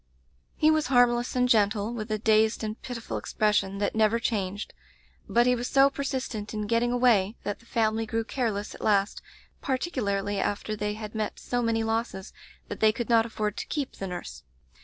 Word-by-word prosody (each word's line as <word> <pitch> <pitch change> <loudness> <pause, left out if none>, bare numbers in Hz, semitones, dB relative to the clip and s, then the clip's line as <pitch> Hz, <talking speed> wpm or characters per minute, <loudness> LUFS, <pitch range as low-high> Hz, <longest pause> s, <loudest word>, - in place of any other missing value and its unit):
"He 310 0 +5
was 310 -1 +1
harmless 245 -1 +3
and 250 0 +3
gentle, 215 -1 +2
with 220 -1 -5
a 215 - +1
dazed 220 +1 +2
and 215 +1 -4
pitiful 245 -3 -5
expression 205 -2 0
that 205 0 -1
never 220 +1 +3
changed, 205 -4 -2 0.6
but 240 +1 +4
he 250 - +4
was 245 0 -2
so 275 0 +5
persistent 255 -7 -4
in 210 0 -2
getting 235 +3 +1
away 235 -5 +3
that 205 - -3
the 235 - -22
family 225 -1 0
grew 225 0 -1
careless 220 -4 -2
at - - -11
last, 200 -1 +1 0.4
particularly 205 - -1
after 205 +2 -2
they 210 0 -2
had 215 -1 -7
met 215 -1 -3
so 245 0 -2
many 225 -1 +1
losses 225 -4 -3 0.3
that 205 - -6
they 220 -1 +5
could 235 +2 -5
not 230 -1 +4
afford 210 -2 -3
to - - -4
keep 285 -4 -3
the 195 - -4
nurse. 180 -1 -7
220 Hz, 185 wpm, -27 LUFS, 210-240 Hz, 0.6 s, He